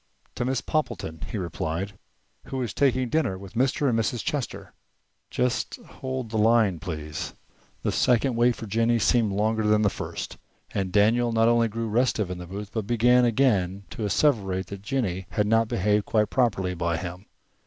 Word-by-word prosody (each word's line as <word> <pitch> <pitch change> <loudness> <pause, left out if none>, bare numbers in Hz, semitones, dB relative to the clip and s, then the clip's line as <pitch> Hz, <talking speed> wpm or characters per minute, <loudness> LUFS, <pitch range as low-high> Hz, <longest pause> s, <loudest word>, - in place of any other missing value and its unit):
"To 120 - -2
Miss 130 0 0
Poppleton," 80 - -2
he - - -3
replied, 85 +1 -3 0.5
"who 135 - -4
is 120 - -4
taking 130 -2 +2
dinner 130 -8 0
with 95 +1 -11
Mr. 135 +4 +1
and 115 -3 +2
Mrs. 115 +1 -1
Chester." 145 -5 -4 0.6
"Just 125 -1 -1
hold 130 -3 -6
the 110 - 0
line, 110 -5 +4
please." 75 -4 -5 0.5
The - - +1
second 125 +1 +2
wait 120 +1 +3
for - - -7
Jennie 115 +3 +2
seemed 115 -1 +2
longer 110 +3 +1
than 105 0 +3
the 105 - +3
first, - - -6 0.4
and 95 -2 -1
Daniel 115 +5 +3
not 115 0 +3
only 120 0 +3
grew 115 +1 -3
restive 110 -4 +1
in 90 - -5
the 90 - -8
booth, 100 +2 -7
but 110 -3 -3
began 120 +1 +4
again 100 -6 +2
to 110 - -5
asseverate 100 -4 +1
that 100 -1 -7
Jennie 100 -6 -2
had 105 - 0
not 115 +1 +3
behaved 105 +1 +1
quite 105 -2 +1
properly 100 -8 +1
by 85 -1 -1
him. 90 +3 -7
110 Hz, 175 wpm, -26 LUFS, 95-120 Hz, 0.6 s, line